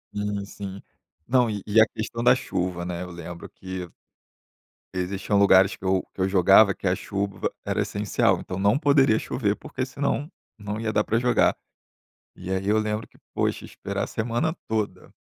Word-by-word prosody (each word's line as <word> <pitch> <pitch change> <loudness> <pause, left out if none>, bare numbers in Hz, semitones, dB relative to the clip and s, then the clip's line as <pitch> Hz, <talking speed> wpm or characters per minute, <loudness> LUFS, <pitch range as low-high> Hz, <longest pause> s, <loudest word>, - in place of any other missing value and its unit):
Sim, 105 -1 -2
sim. 100 -1 -8 0.5
Não 125 -2 +3
e 105 -2 -3
e 110 +2 +5
a - - +7
questão 115 +2 -5
da 120 - +7
chuva, 90 -1 -3
né, 90 0 -4
eu 90 - -8
lembro 85 0 -8
que 95 -1 -7 1.0
existiam 95 +2 -1
lugares 100 -1 +5
que - - -20
eu 95 0 +1
que - - -5
eu 95 - +2
jogava 95 +2 +6
que 95 - -4
a 90 - +3
chuva 100 0 -3
era - - 0
essencial. - - +1
Então, 90 - -6
não 100 +5 +3
poderia 140 -6 +4
chover, 105 -5 -1
porque 130 - -5
senão 140 +3 -2 0.3
não 105 0 -5
ia 110 -1 -1
dar 105 - +3
pra 115 - +1
jogar. 125 -1 +3 0.8
E - - -9
aí 95 +1 -1
eu 110 - +4
lembro 110 0 -1
que, - - -25 0.2
poxa, - - -1
esperar - - -4
a - - -3
semana 120 +9 -1
toda, 110 -2 -3
100 Hz, 180 wpm, -25 LUFS, 95-110 Hz, 1.0 s, a